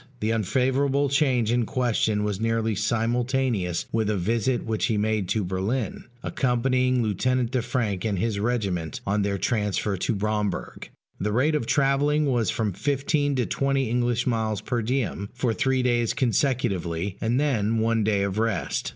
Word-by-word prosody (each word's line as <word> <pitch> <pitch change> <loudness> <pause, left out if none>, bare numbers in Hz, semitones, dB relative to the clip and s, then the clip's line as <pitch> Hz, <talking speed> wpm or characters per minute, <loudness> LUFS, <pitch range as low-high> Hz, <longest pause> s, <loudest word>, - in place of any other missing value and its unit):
The 110 +1 0
unfavorable 130 +6 +1
change 130 -5 +2
in 120 -2 +1
question 110 -4 +1
was 105 -1 -2
nearly 115 0 +1
simultaneous 115 -2 0
with 110 -2 0
a 105 - +1
visit 115 +6 0
which 110 -1 0
he 110 - 0
made 105 -2 0
to 110 - +1
Berlin, 95 +6 -2 0.2
accompanying 125 0 +1
Lieutenant 120 +4 0
de 130 - +1
Franck 110 -6 -2
and 105 -3 -1
his 105 +2 -1
regiment, 100 -8 -1
on 100 +1 +1
their 100 0 0
transfer 105 -2 0
to 110 +5 -1
Bromberg: 105 -1 -2 0.3
the 105 +2 -1
rate 130 +8 +2
of 145 -7 -1
travelling 145 +2 +2
was 120 -7 +1
from 105 -4 -1
fifteen 145 - 0
to 125 -2 +1
twenty 135 -2 0
English 120 0 +1
miles 110 -4 0
per 120 -1 -1
diem, 110 -4 -2
for 125 -2 0
three 130 +2 +1
days 120 -2 +1
consecutively, 100 - 0
and 120 +3 +1
then 115 -7 +1
one 115 0 +1
day 100 -2 +1
of 100 +1 -1
rest. 110 -6 -1
115 Hz, 160 wpm, -25 LUFS, 105-130 Hz, 0.3 s, change